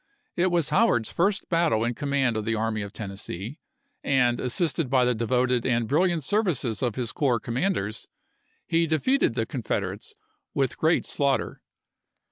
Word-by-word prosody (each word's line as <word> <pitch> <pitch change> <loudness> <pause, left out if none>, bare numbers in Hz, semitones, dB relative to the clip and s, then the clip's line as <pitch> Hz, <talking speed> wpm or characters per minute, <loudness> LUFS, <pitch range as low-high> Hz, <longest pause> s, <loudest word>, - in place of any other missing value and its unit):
It 180 +2 +2
was 170 -4 +1
Howard's 120 -6 +2
first 190 +2 +1
battle 165 -10 +2
in 120 +1 0
command 140 -3 0
of 110 - -1
the 115 +1 0
Army 110 0 -1
of 100 -1 -6
Tennessee, 100 - -6 0.4
and, 125 -3 +2
assisted 135 +2 0
by 130 -1 +3
the 125 - +2
devoted 125 +1 +1
and 115 -3 +1
brilliant 165 +3 +2
services 145 - 0
of 120 -4 0
his 120 -3 -2
corps 130 -5 +1
commanders, 120 - -2 0.6
he 165 0 +1
defeated 255 - +1
the - - 0
Confederates 435 -2 -4 0.4
with 135 -4 0
great 160 +1 +2
slaughter. 140 -2 -1
130 Hz, 150 wpm, -26 LUFS, 115-165 Hz, 0.6 s, by